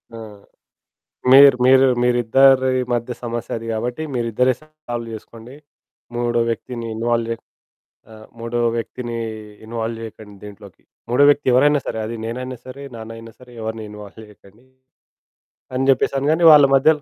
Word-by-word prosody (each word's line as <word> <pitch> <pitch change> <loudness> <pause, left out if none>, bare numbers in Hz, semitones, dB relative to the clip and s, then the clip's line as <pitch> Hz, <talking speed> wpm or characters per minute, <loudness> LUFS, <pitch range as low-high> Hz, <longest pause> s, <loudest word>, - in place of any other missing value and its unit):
ఆ! - - -8 1.1
మీర్ 140 -1 +8
మీరు 130 +1 +6 0.2
మీరిద్దరి 130 +2 +4 0.2
మధ్య 120 +1 -2
సమస్య 120 0 -4
అది 115 0 -8
కాబట్టి 120 +7 -4
మీరిద్దరే 120 +2 +1
సాల్వ్ 155 -7 -8
జేసుకోండి. 115 +4 -11 0.6
మూడో 120 -1 0
వ్యక్తిని 115 0 -5
ఇన్వాల్వ్ 115 0 -1
జే 115 - -1 0.8
ఆహ్, 110 0 -14
మూడో 115 +1 -3 0.2
వ్యక్తిని 120 0 -5 0.5
ఇన్వాల్వ్ 115 0 -4
జేయకండి 110 -2 -11
దీంట్లోకి. 100 -2 -13 0.3
మూడో 125 +4 +3
వ్యక్తి 145 -1 +1
ఎవరైనా 145 +3 +4
సరే, - - -4
అది 115 +1 -5
నేనైనా 125 +2 -5
సరే, 135 +2 -10
నాన్నయినా 115 0 -10
సరే, 125 -1 -16
ఎవరిని 110 0 -5
ఇన్వాల్వ్ 105 +1 -11
జేయకండి. 105 +3 -21 1.1
అని 135 +1 -1
జెప్పేసాను 135 +1 +1
గాని 165 +2 +1
వాళ్ళ 145 -2 +8
మధ్యలో 150 +2 +3
120 Hz, 135 wpm, -20 LUFS, 115-130 Hz, 1.1 s, మీర్